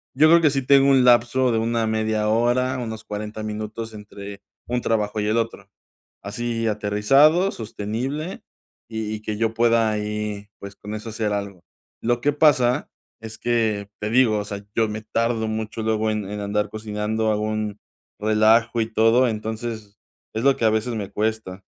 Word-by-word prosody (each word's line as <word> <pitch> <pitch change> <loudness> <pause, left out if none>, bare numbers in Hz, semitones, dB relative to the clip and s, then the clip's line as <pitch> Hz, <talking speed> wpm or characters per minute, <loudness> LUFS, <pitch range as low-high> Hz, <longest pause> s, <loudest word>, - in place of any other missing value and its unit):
Yo 155 +4 +6
creo 170 +1 +7
que 155 - +5
sí 135 0 0
tengo 140 +1 +5
un 135 -2 +5
lapso 125 +1 +4
de 115 - +1
una 115 0 0
media 110 -1 0
hora, 120 +3 +2
unos 110 -2 -5
40, 105 +1 -5
minutos 110 +1 -5
entre 100 -1 -10 0.3
un 125 0 -1
trabajo 105 -1 0
y 105 - -1
el 110 +2 +1
otro. 115 -3 -3 0.6
Así 115 +2 -3
aterrizado, 135 - +3
sostenible 120 - -4 0.5
y 110 -1 -4
y 105 - -7
que 110 -1 -3
yo 115 0 0
pueda 115 -1 +3
ahí, 105 -1 -3
pues, 100 0 -10
con 105 +1 -7
eso 110 +1 -6
hacer 110 -1 -2
algo. 100 -3 -5 0.4
Lo 120 +1 +1
que 145 +4 +2
pasa 145 -3 +3 0.3
es 110 0 -9
que 110 -4 0
te 105 - -2
digo, 115 -3 +4
o 105 - -3
sea, 100 -1 -6
yo 115 -1 +2
me 105 0 -4
tardo 115 0 -1
mucho 110 0 -4
luego, 110 0 0
en 105 -2 -3
en 105 0 -4
andar 105 +1 -1
cocinando 110 0 -2
algún 105 0 -2 0.4
relajo 110 +2 +3
y 110 0 -2
todo. 115 +3 +4
Entonces, 110 -1 -5 0.4
es 110 - -2
lo 140 -1 +4
que - - -2
a - - +5
veces 110 +2 -1
me 100 -3 -4
cuesta. 105 -2 -3
110 Hz, 175 wpm, -23 LUFS, 105-120 Hz, 0.6 s, creo